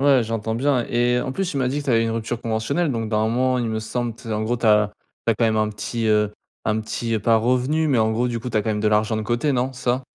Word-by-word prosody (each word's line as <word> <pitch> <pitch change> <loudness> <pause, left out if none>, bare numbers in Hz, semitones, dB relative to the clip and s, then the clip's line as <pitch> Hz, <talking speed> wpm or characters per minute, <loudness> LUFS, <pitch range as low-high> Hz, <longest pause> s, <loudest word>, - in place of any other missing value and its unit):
Ouais, 135 -2 +5
j'entends 110 0 -2
bien 130 0 +1
et 120 +1 +2
en 130 - -3
plus 190 +5 -2
tu 140 - -5
m'as 130 - +1
dit 140 +3 -1
que 145 - -8
tu 135 - +1
avais 115 -1 +3
une 115 - -1
rupture 115 +1 -3
conventionnelle 125 +8 -1
donc 115 -2 -2
dans 110 0 +1
un 110 - +1
moment, 125 +2 +1
il 120 -2 -1
me 110 0 -2
semble, 120 +1 -3
tu 120 - -17
sais 115 - -4
en 105 0 -1
gros 120 +3 0
tu 115 - -6
as 105 -1 +4 0.3
tu 115 - +4
as - - -5
quand 115 - +1
même 110 -1 +2
un 110 0 +2
petit, 105 +2 -3
heu, 105 -1 +2 0.3
un 110 0 +1
petit, 115 +1 -3
heu, 110 - +1
pas 115 +3 +4
revenu 130 +7 +1
mais 135 -4 +3
en 110 0 +2
gros 120 +2 0
du 120 - -2
coup 115 - -5
t'as 110 -3 0
quand 110 - -3
même 105 - -1
de 110 - 0
l'argent 105 +1 +2
de 110 - -2
côté, 120 +7 0
non, 130 +1 0
c'est 130 0 -11
ça? 130 +2 -1
115 Hz, 325 wpm, -22 LUFS, 110-125 Hz, 0.3 s, Ouais